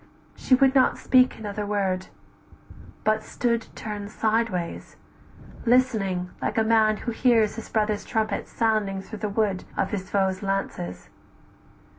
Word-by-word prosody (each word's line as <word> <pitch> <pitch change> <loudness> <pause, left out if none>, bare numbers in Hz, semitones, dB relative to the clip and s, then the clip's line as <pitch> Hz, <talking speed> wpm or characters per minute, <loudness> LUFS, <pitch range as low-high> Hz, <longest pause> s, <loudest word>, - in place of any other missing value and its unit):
She 255 - +3
would 265 0 +4
not 260 -2 +4
speak 255 -1 +3
another 210 -1 -4
word, 195 -3 -1 1.0
but 215 0 +2
stood 235 0 -1
Turn'd 205 -2 -6
sideways; 215 -6 -1 0.7
listening, 215 -8 +1
like 220 - -2
a 220 - +4
man 220 -1 +3
who 235 - -4
hears 225 -3 +3
His 225 - -8
brother's 215 -1 0
trumpet 215 -2 -1
sounding 215 -4 0
through 220 +1 -9
the 210 0 -2
wood 200 -2 0
Of - - 0
his 190 -3 -4
foes' 190 -2 0
lances. 195 - -3
215 Hz, 135 wpm, -25 LUFS, 195-225 Hz, 1.0 s, would